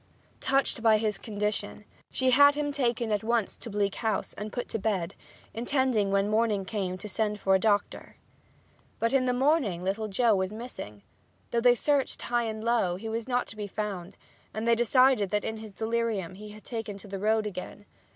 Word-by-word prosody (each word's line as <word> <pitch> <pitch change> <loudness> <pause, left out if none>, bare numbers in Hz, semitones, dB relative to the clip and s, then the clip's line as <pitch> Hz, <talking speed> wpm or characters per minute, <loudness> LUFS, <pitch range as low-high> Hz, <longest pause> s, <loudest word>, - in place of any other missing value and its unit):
Touched 270 -3 +1
by 220 -1 +5
his 215 -1 -1
condition 210 -1 -3 0.2
she 260 -1 +1
had 285 +3 +7
him 295 -1 -1
taken 240 -5 0
at 210 0 0
once 230 -2 0
to 230 - -9
Bleak 200 -2 0
House 220 -2 -2
and 210 +1 -6
put 245 - -4
to 225 - -2
bed, 195 -5 -1 0.4
intending 240 -3 +1
when 195 0 +2
morning 215 -2 +1
came 185 -3 -3
to 200 - -7
send 210 0 -1
for 195 -1 +2
a 190 - +5
doctor. 205 -1 0 0.8
But 230 +3 0
in 265 -2 +3
the 250 - +2
morning 250 - +1
little 200 +4 -1
Joe 225 +3 +3
was 190 -1 0
missing. 215 - -8 0.5
Though 235 - +1
they 245 0 +6
searched 280 +3 0
high 240 -1 0
and 220 -1 -4
low 230 -7 +2
he 220 +5 -6
was 230 +1 -3
not 250 -1 +1
to - - -7
be 210 -1 -5
found, 200 -3 -5 0.4
and 220 +2 -2
they 235 - +6
decided 240 -2 +4
that 210 +2 0
in 220 - -3
his 220 -1 -9
delirium 220 -3 -1
he 210 +3 -10
had 210 0 -12
taken 225 -4 -5
to 200 - -12
the 195 -1 -5
road 215 +2 +2
again. 205 +1 -7
220 Hz, 200 wpm, -28 LUFS, 205-235 Hz, 0.8 s, had